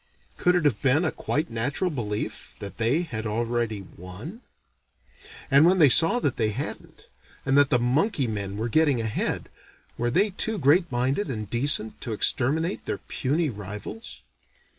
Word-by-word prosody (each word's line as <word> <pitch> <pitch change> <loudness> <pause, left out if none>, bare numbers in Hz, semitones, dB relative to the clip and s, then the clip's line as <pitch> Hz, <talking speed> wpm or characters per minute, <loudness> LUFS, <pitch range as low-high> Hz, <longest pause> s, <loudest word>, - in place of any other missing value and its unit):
Could 180 0 +2
it 175 -3 +1
have 130 -8 +1
been 140 +6 +3
a 160 - 0
quite 150 -2 -2
natural 140 +10 -1
belief 105 -7 -5
that 100 - -8
they 125 +10 +2
had 110 -9 -5
already 115 -1 -2
won? 95 - -10 1.1
And 140 +2 +7
when 180 +3 +5
they 155 -5 +7
saw 165 - +6
that 140 - -1
they 110 -2 +1
hadn't, 120 +7 -7 0.4
and 135 - +2
that 145 -1 +5
the 125 - +4
monkey 135 - +1
men 100 -3 -4
were 110 +2 -2
getting 145 0 +2
ahead, 110 -2 -2 0.5
were 120 +1 0
they 200 - +2
too 220 +3 -2
great 170 +3 +3
minded 130 +9 0
and 110 -5 -4
decent 120 -1 +1
to 115 - -4
exterminate 155 - 0
their - - -2
puny 150 +3 -2
rivals? 105 - -8
130 Hz, 160 wpm, -25 LUFS, 110-160 Hz, 1.1 s, And